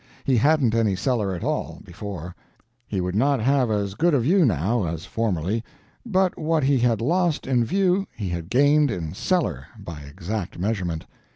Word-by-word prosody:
He 135 Hz, -, +2 dB
hadn't 140 Hz, -2 st, +3 dB
any 110 Hz, -4 st, +2 dB
cellar 105 Hz, -2 st, 0 dB
at 85 Hz, -, -6 dB
all, -, -, -2 dB
before; 90 Hz, -2 st, -7 dB, 0.5 s
he 100 Hz, -, -2 dB
would 90 Hz, 0 st, -2 dB
not 135 Hz, +6 st, +2 dB
have 130 Hz, +1 st, +2 dB
as 100 Hz, -2 st, -1 dB
good 165 Hz, -, +2 dB
a -, -, +3 dB
view, 170 Hz, +10 st, +3 dB
now, 105 Hz, -, +1 dB
as 80 Hz, +1 st, -4 dB
formerly, 105 Hz, +1 st, -1 dB, 0.4 s
but 190 Hz, -5 st, +1 dB
what 155 Hz, -1 st, +1 dB
he 135 Hz, -1 st, +3 dB
had 115 Hz, -3 st, +2 dB
lost 170 Hz, +4 st, +1 dB
in 125 Hz, -3 st, +2 dB
view 190 Hz, -, +1 dB
he 100 Hz, -4 st, -3 dB
had 85 Hz, -1 st, -4 dB
gained 145 Hz, +4 st, +4 dB
in 85 Hz, -8 st, -4 dB
cellar, 180 Hz, -, -1 dB
by 85 Hz, -7 st, -8 dB
exact 85 Hz, +7 st, -5 dB
measurement. 90 Hz, -4 st, -2 dB
115 Hz, 175 wpm, -24 LUFS, 95-145 Hz, 0.5 s, gained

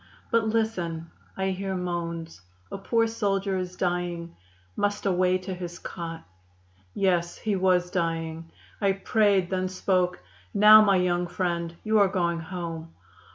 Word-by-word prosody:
But 230 Hz, -1 st, +3 dB
listen! 180 Hz, -8 st, -1 dB, 0.3 s
I 190 Hz, 0 st, 0 dB
hear 190 Hz, 0 st, -3 dB
moans. 170 Hz, -, -4 dB, 0.3 s
A -, -, -4 dB
poor 230 Hz, +3 st, +2 dB
soldier 200 Hz, -3 st, -1 dB
is 180 Hz, 0 st, -5 dB
dying; 175 Hz, -2 st, -2 dB, 0.4 s
must 205 Hz, 0 st, -1 dB
away 185 Hz, -1 st, +3 dB
to 185 Hz, +1 st, -6 dB
his 175 Hz, -1 st, -6 dB
cot. 165 Hz, -2 st, -7 dB, 0.7 s
Yes, 175 Hz, -3 st, +1 dB
he 215 Hz, -2 st, -1 dB
was 180 Hz, -1 st, +2 dB
dying. 165 Hz, -1 st, -2 dB, 0.3 s
I 200 Hz, -1 st, +3 dB
prayed, 195 Hz, -2 st, +2 dB
then 185 Hz, 0 st, 0 dB
spoke: 185 Hz, -1 st, 0 dB, 0.4 s
'Now, 210 Hz, +1 st, +9 dB
my 200 Hz, -2 st, +4 dB
young 175 Hz, -1 st, +1 dB
friend, 170 Hz, -1 st, -2 dB
you 215 Hz, 0 st, +3 dB
are 200 Hz, -, +6 dB
going 175 Hz, -3 st, 0 dB
home. 165 Hz, -1 st, -6 dB
180 Hz, 140 wpm, -26 LUFS, 170-195 Hz, 0.7 s, Now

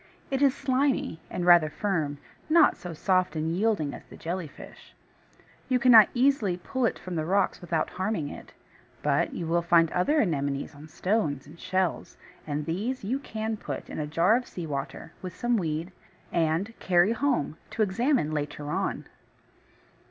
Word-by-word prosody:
It 270 Hz, 0 st, 0 dB
is 280 Hz, -1 st, +4 dB
slimy, 260 Hz, -, 0 dB
and 180 Hz, -, -3 dB
rather 175 Hz, -3 st, +6 dB
firm, 155 Hz, -5 st, -2 dB, 0.3 s
not 315 Hz, -1 st, +5 dB
so 175 Hz, -, -8 dB
soft 185 Hz, +2 st, +1 dB
and 160 Hz, +1 st, -1 dB
yielding 190 Hz, -8 st, 0 dB
as -, -, -9 dB
the -, -, -13 dB
Jelly 170 Hz, 0 st, -4 dB
fish. -, -, -14 dB, 0.7 s
You 255 Hz, -, +3 dB
cannot 240 Hz, -4 st, +8 dB
easily 240 Hz, -8 st, +2 dB
pull 250 Hz, +7 st, -1 dB
it -, -, -3 dB
from 185 Hz, -, -7 dB
the 160 Hz, -2 st, -1 dB
rocks 190 Hz, +4 st, +1 dB
without 165 Hz, -3 st, -1 dB
harming 185 Hz, -6 st, -2 dB
it; -, -, -10 dB, 0.5 s
but -, -, +1 dB
you 170 Hz, -, -4 dB
will 170 Hz, +1 st, +1 dB
find 170 Hz, -1 st, +4 dB
other 290 Hz, -, +2 dB
Anemones 140 Hz, -, -1 dB
on 145 Hz, +2 st, -12 dB
stones 155 Hz, -4 st, -1 dB
and 165 Hz, +3 st, -15 dB
shells; 185 Hz, -2 st, -2 dB, 0.3 s
and 150 Hz, 0 st, -2 dB
these 210 Hz, -, -3 dB
you 250 Hz, +7 st, -1 dB
can 220 Hz, -5 st, -4 dB
put -, -, -6 dB
in -, -, -5 dB
a 150 Hz, -, -2 dB
jar 170 Hz, +8 st, +3 dB
of 250 Hz, -, -6 dB
sea 175 Hz, -, -6 dB
water, 140 Hz, +2 st, -5 dB
with 185 Hz, -2 st, -7 dB
some 240 Hz, 0 st, 0 dB
weed, 165 Hz, -2 st, -2 dB, 0.4 s
and 170 Hz, +6 st, 0 dB
carry 180 Hz, +3 st, +3 dB
home 235 Hz, -, 0 dB
to 225 Hz, -, 0 dB
examine 235 Hz, -, +1 dB
later 145 Hz, -1 st, -4 dB
on. -, -, -2 dB
180 Hz, 170 wpm, -27 LUFS, 155-225 Hz, 0.7 s, cannot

